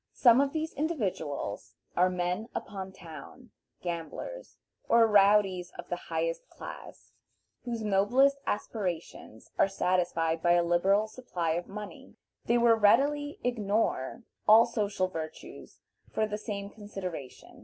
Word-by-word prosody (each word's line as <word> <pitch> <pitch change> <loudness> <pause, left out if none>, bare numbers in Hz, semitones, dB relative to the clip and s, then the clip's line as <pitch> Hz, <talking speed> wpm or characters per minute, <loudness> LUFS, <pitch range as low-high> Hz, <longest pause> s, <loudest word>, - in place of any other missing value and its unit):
Some 245 +1 +6
of 280 -1 +1
these 315 +1 -3
individuals 170 - -3 0.2
are 180 +1 +4
men 180 +4 -2
upon 190 -1 -5
town, 175 - -12 0.3
gamblers, 175 - -6 0.3
or 230 0 +6
rowdies 200 -3 +4
of - - -9
the - - 0
higher - - -2 0.2
class, - - -10 0.5
whose 235 -2 -3
noblest 240 +8 +3
aspirations 180 - -4
are - - +6
satisfied 175 -4 0
by 175 0 +4
a 175 0 +4
liberal 190 +5 +3
supply 200 -8 -3
of 175 +2 -2
money. 210 +1 -9 0.3
They 235 - +3
will 235 -1 +5
readily 285 +7 +3
ignore 220 - -1 0.2
all 220 +2 +8
social 210 -5 -1
virtues 160 -4 -8 0.3
for 220 - +1
the 210 0 -4
same 200 -2 -5
consideration. 185 - -8
200 Hz, 125 wpm, -29 LUFS, 175-235 Hz, 0.5 s, all